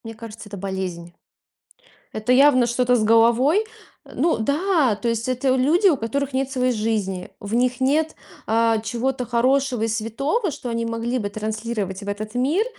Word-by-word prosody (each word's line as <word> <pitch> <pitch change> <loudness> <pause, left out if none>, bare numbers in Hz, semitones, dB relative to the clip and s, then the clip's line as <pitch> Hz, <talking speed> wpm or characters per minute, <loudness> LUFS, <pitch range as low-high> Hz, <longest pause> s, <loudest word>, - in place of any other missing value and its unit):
к - - -72
Мне 225 0 -7
кажется, 225 -1 -10
это 205 - -8
болезнь. 185 -3 -5 1.0
Это 215 +3 -2
явно 255 -2 +5
что-то 250 +1 +2
с 225 - +1
головой. 235 - +4 0.4
Э, - - -15
ну 335 - +1
да, 285 - +1
то 235 +3 -2
есть 230 +1 -2
это 255 +1 0
у - - +1
люди, 315 +10 +3
у 320 -7 +4
которых 275 +4 -2
нет 270 0 -1
своей 255 -1 +1
жизни, 210 -5 -2
в 205 +2 -4
них 250 +1 +1
нет, 300 +4 +1 0.3
а, 225 0 +2
чего-то 250 +3 -2
хорошего 250 +1 +1
и - - +1
святого, 235 - -1
что 255 -3 -6
они 230 0 -2
могли 230 +2 -2
бы 205 -3 -3
транслировать 215 -2 -4
в - - -10
этот 215 +2 -5
мир, 295 - +1
235 Hz, 185 wpm, -22 LUFS, 220-265 Hz, 1.0 s, явно